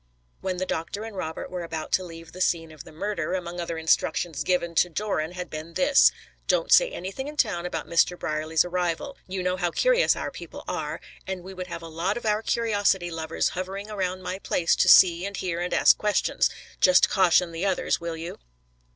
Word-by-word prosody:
When 185 -1 -3
the 185 - -1
doctor 185 +5 -3
and 225 -2 -8
Robert 160 -3 -5
were 180 -1 -4
about 165 -2 -5
to 185 - +2
leave 165 -2 -10
the 185 - -8
scene 165 -3 +1
of 155 -2 -11
the - - -12
murder, 175 0 -2
among 175 -1 -5
other 170 -1 -3
instructions 160 0 +1
given 175 -2 0
to 180 +2 +3
Doran 175 -2 -2
had 180 -1 -5
been 155 +2 -8
this: 275 +4 +5 0.4
"Don't - - +1
say - - +7
anything 195 - -6
in 300 0 -8
town 180 -9 +1
about 160 -3 -4
Mr. 170 +1 +2
Brierly's 155 +1 0
arrival; 180 - -2
you 185 -1 -3
know 180 0 0
how 175 -1 0
curious - - +3
our - - -4
people - - -9
are, - - -3 0.3
and 190 -2 -4
we 190 +1 -9
would 185 -1 -6
have 170 -1 -7
a - - -7
lot 170 +6 -2
of 240 - -7
our 210 0 +1
curiosity 205 -6 +1
lovers 160 0 -1
hovering 195 +3 -5
around 185 -2 -3
my 185 - -4
place 170 -4 +1
to - - +4
see 175 -1 +7
and 200 0 -4
hear 175 -2 -2
and 175 +1 -2
ask - - +5
questions. 210 -1 +1 0.3
Just 185 -1 +6
caution 180 -2 +3
the 165 +4 -2
others, 190 -3 0
will 170 -1 -4
you?" 165 +1 -7
180 Hz, 210 wpm, -26 LUFS, 165-195 Hz, 0.4 s, say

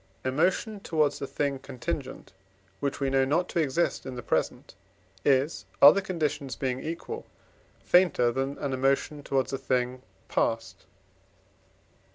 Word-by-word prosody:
Emotion 180 - +1
towards 155 -6 0
a 140 - -3
thing 140 -1 -1
contingent, 135 - -5 0.5
which 140 -1 -2
we 135 -1 0
know 135 0 +4
not 160 +7 +1
to - - -2
exist 160 +2 0
in 130 -1 -6
the 120 - -6
present, - - -1 0.5
is, 140 +3 +2
other 150 +8 +8
conditions 150 -8 -2
being 130 -1 -2
equal, 170 - -5 0.6
fainter 175 -10 +4
than 135 +3 -2
an 140 -2 -3
emotion 135 +3 0
towards 135 -1 -1
a 135 - -1
thing 125 -1 -1 0.3
past. 115 -5 -1
140 Hz, 135 wpm, -28 LUFS, 130-160 Hz, 0.6 s, other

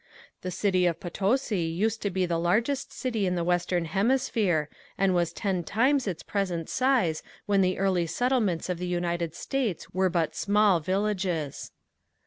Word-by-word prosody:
The 185 - -4
city 185 -1 +2
of 170 -1 -1
Potosi 205 +4 0
used 195 +7 -1
to 200 - 0
be 185 -1 0
the 170 -1 -1
largest 230 +11 0
city 225 -6 -1
in 180 - 0
the 170 - 0
western 175 0 +1
hemisphere 200 - +1 0.3
and 195 -1 +2
was 175 -2 +1
ten 190 -4 -2
times 255 - +2
its 180 -4 -3
present 180 -5 -2
size 250 -12 +2 0.2
when 200 -2 +3
the 185 0 +1
early 185 -3 +1
settlements 225 -6 0
of 180 -2 -2
the 180 - -3
United 175 -2 -2
States 245 - -3
were 185 +1 +2
but 165 -3 0
small 205 -3 +3
villages. 185 -4 -2
185 Hz, 160 wpm, -27 LUFS, 175-210 Hz, 0.3 s, when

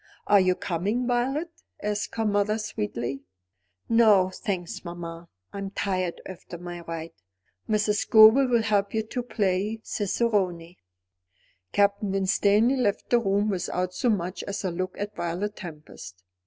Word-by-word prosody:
"Are 205 -1 +6
you 185 -1 +3
coming, 200 +10 -1
Violet?" 265 +7 0 0.3
asked 210 0 -3
her 225 - 0
mother 205 +1 +1
sweetly. 125 - -4 0.7
"No, 210 -5 +5
thanks, 185 -4 -4
mamma. 170 -1 -8 0.2
I 200 - -5
am 195 0 -4
tired 185 -3 -2
after 180 -1 -9
my 175 0 -7
ride. 165 -1 -6 0.6
Mrs. 210 -1 +2
Scobel 220 +6 +7
will 235 -2 +2
help 205 -1 +1
you 220 - +1
to 235 +3 -4
play 210 -2 -1
cicerone." 190 -5 -1 0.9
Captain 200 0 +2
Winstanley 205 +6 +3
left 205 -6 -1
the 240 - +5
room 205 -1 +1
without 180 -1 -2
so 245 - 0
much 185 -3 -1
as 200 +1 -4
a 185 - -1
look 185 +2 -4
at 205 +1 -5
Violet 180 +5 -3
Tempest. 150 - -10
200 Hz, 140 wpm, -26 LUFS, 180-215 Hz, 0.9 s, Scobel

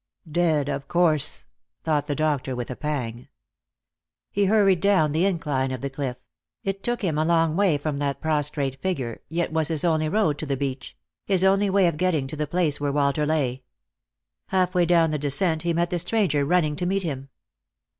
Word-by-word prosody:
" 160 - -17
Dead, 155 -4 +2
of 140 -1 -4
course," 165 -4 +2 0.4
thought 150 -2 0
the 145 - -1
doctor 145 -4 -1
with 120 0 -5
a - - -4
pang. 125 -6 -4 1.0
He 200 0 +1
hurried 195 -3 +3
down 190 -7 +3
the 165 +6 +2
incline 145 -8 -1
of 130 -2 -5
the 140 - -4
cliff; 135 -3 -4 0.5
it 195 0 -3
took 240 0 -2
him 160 -5 0
a - - +2
long 165 -1 +2
way 190 -5 +3
from 145 -1 -3
that 140 -1 -2
prostrate 145 -3 -1
figure, 135 -12 -3
yet 165 0 -2
was 160 -2 +2
his 160 -1 0
only 155 -2 +1
road 165 -6 +1
to 155 - -5
the 135 -1 -1
beach 135 -1 -5
— - - -65
his 190 -2 +3
only 195 +1 +3
way 195 -1 +3
of 170 -3 +1
getting 165 -5 +1
to 135 - -6
the 150 0 -2
place 155 -3 0
where 145 -1 0
Walter 145 +1 +1
lay. 135 -5 0 0.9
Halfway 180 -2 +1
down 165 -2 +4
the 150 - -1
descent 155 +3 +1
he 170 +1 0
met 170 +1 0
the 175 - 0
stranger 175 -6 +1
running 155 -2 +2
to 175 - -1
meet 195 +1 0
him. 135 -4 -5
155 Hz, 200 wpm, -24 LUFS, 140-180 Hz, 1.0 s, down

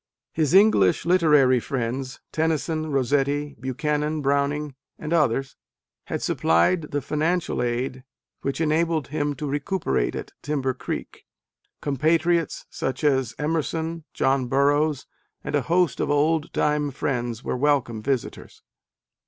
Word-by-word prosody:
His 155 +1 +1
English 195 - +5
literary 150 -8 +4
friends, 130 +1 -4
Tennyson, 155 0 -1
Rossetti, 140 +2 0
Buchanan, 150 +4 -1
Browning 140 +1 0 0.2
and 155 +2 -4
others, 135 -4 +1 0.5
had - - -4
supplied 150 - +2
the 145 -2 -2
financial 155 +2 0
aid 125 +2 -2 0.4
which 135 +2 -2
enabled 160 -1 +1
him 145 -1 -1
to 150 - -5
recuperate 145 - -1
at - - -6
Timber 135 -3 -1
Greek: - - -6 0.5
compatriots 160 +3 +1
such 130 +2 -3
as 135 -5 +1
Emerson, 160 +1 -2
John 135 -1 +1
Burroughs, 145 +2 +2 0.4
and - - -5
a - - +2
host 170 -4 +1
of - - 0
old 150 +2 +1
time 150 -1 +1
friends 120 -4 -3
were - - -2
welcome 130 -5 +1
visitors. 130 +1 -4
145 Hz, 120 wpm, -24 LUFS, 135-155 Hz, 0.5 s, English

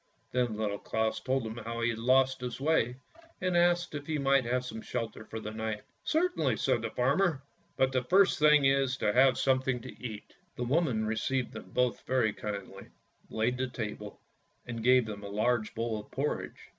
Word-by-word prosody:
Then 120 -4 0
Little 105 -2 -2
Claus 110 0 -1
told 130 -2 -1
him 110 +1 -6
how 115 +1 -5
he 115 0 +2
had 115 - -5
lost 130 +2 +3
his 125 -1 -4
way, 135 -5 +2 0.4
and 180 -1 0
asked 175 0 +3
if 145 -1 -6
he 155 -1 -1
might 135 -2 +3
have 125 +1 0 0.2
shelter 115 -3 -4
for 110 - -6
the 110 -1 -6
night. 110 -1 -4 0.2
" - - -44
Certainly," 360 +3 +2
said - - +1
the - - -3
farmer; 175 -9 +1 0.2
" - - -39
but 130 0 +3
the 130 -1 +1
first 195 +6 +4
thing 150 -2 +6
is 135 -1 +2
to 105 - +1
have 130 +1 +5
something 130 -1 +1
to 130 - -11
eat." 110 -4 -7 0.2
The 125 - -3
woman 125 -4 +1
received 120 +4 -1
them - - -9
both 125 -1 0
very 125 -5 +2
kindly, 100 -2 -6 0.4
laid 115 +3 0
the 130 - 0
table, 105 -4 -6 0.5
and 115 -2 -5
gave 125 0 +5
them 105 -1 -7
a 100 - -6
large 110 +2 0
bowl 115 -1 -2
of 105 - -12
porridge. 145 +3 -4
125 Hz, 195 wpm, -30 LUFS, 110-135 Hz, 0.5 s, thing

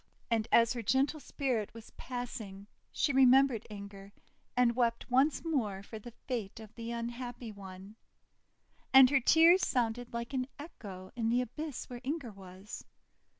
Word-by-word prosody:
And 225 -1 +1
as 230 +1 +5
her 240 - -4
gentle 265 +7 +1
spirit 245 -8 -2
was 225 -1 -12
passing 225 -6 -7 0.3
she 285 - 0
remembered 260 -2 +5
Inger, 200 -1 -9 0.5
and 240 -2 +4
wept 235 0 0
once 275 +6 +3
more 215 -12 -1
for 220 +1 -9
the 235 +2 -11
fate 225 -5 -4
of 220 -1 -12
the 230 0 -7
unhappy 235 0 -5
one. 195 +1 -11 0.9
And 265 -1 +8
her 275 - +5
tears 330 +8 +6
sounded 240 -1 -1
like 235 +3 -5
an 255 -1 -1
echo 200 - -10
in 230 -2 0
the 245 +2 +3
abyss 285 +3 -6
where 245 -1 -8
Inger 275 -3 -3
was. 190 +1 -10
235 Hz, 150 wpm, -32 LUFS, 215-260 Hz, 0.9 s, And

